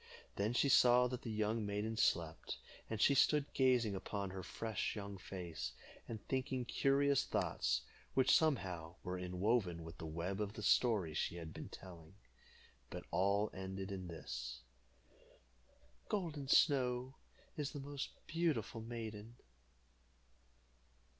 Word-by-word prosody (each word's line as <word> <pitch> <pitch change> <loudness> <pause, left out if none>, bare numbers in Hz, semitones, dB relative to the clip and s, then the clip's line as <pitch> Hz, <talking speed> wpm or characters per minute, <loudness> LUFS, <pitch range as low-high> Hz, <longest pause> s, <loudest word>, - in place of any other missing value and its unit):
Then 105 +4 0
she 130 - +3
saw 125 -2 +7
that 125 0 -4
the 115 - -5
young 110 +1 0
maiden 105 +2 -2
slept, 85 -6 +1 0.3
and 110 - -2
she 140 - +6
stood 145 +1 +3
gazing 125 -5 +3
upon 100 0 -3
her 95 0 -5
fresh 110 +2 -3
young 100 -2 -6
face, 85 -10 -5 0.3
and 110 -2 -7
thinking 130 -1 -1
curious 140 +2 +3
thoughts, 60 0 0 0.3
which 130 -1 +6
somehow 90 - +1
were 90 +1 -3
enwoven 90 -1 0
with 80 +1 -10
the 80 - -5
web 85 +6 -3
of 105 0 -2
the 105 - -7
story 105 -11 +3
she 80 - -1
had 80 -2 -7
been - - -7
telling, 85 -2 -11 0.7
but - - -6
all 100 +3 +2
ended 95 +1 -5
in 95 -2 -4
this: 60 -6 -5 1.5
"Golden 155 -8 -2
Snow 130 -3 +4 0.4
is 145 -2 -2
the 145 - -6
most 140 0 -4 0.2
beautiful 155 -9 0
maiden." 115 -1 -6
105 Hz, 135 wpm, -38 LUFS, 90-125 Hz, 1.5 s, saw